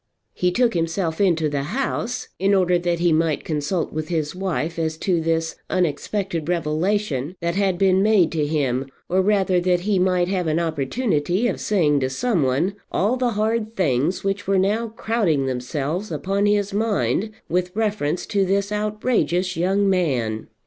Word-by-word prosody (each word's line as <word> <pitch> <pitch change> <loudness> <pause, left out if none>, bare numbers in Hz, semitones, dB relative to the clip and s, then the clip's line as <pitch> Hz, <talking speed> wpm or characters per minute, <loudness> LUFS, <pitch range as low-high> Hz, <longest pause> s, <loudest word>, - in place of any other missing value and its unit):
He 180 0 +1
took 240 +5 +2
himself 165 0 -1
into 165 -5 +3
the 145 -1 -1 0.2
house 250 -2 -2
in 195 +2 +3
order 180 -2 +3
that 175 -1 0
he 170 -1 +2
might 160 -1 +1
consult 155 +3 -2
with 155 0 -3
his 155 -3 -2
wife 170 -4 -2
as 160 -1 -1
to 175 -1 0
this 165 0 -1
unexpected 180 0 -1
revelation 170 -2 -1
that 170 0 -1
had 190 -1 +1
been 190 0 +3
made 205 -5 +4
to 155 -3 0
him; 135 -4 0 0.2
or 185 +2 +3
rather 190 -2 +2
that 180 0 +1
he 200 0 +1
might 180 -1 +2
have 185 -2 -1
an 155 0 +1
opportunity 170 - 0
of 205 - -2
saying 155 -9 +2
to 130 -1 -1
some 200 - 0
one 145 +10 0
all 210 +7 +1
the 250 -2 0
hard 220 +1 0
things 155 0 +1
which 195 0 -2
were 195 0 +3
now 210 +5 +1
crowding 215 - 0
themselves 140 +9 -3
upon 200 +2 0
his 205 -1 +1
mind 215 0 0 0.2
with 180 +1 0
reference 205 -7 -1
to 200 -2 +1
this 200 +2 0
outrageous 210 -4 0
young 195 +4 +1
man. 130 - 0
180 Hz, 170 wpm, -22 LUFS, 160-200 Hz, 0.2 s, made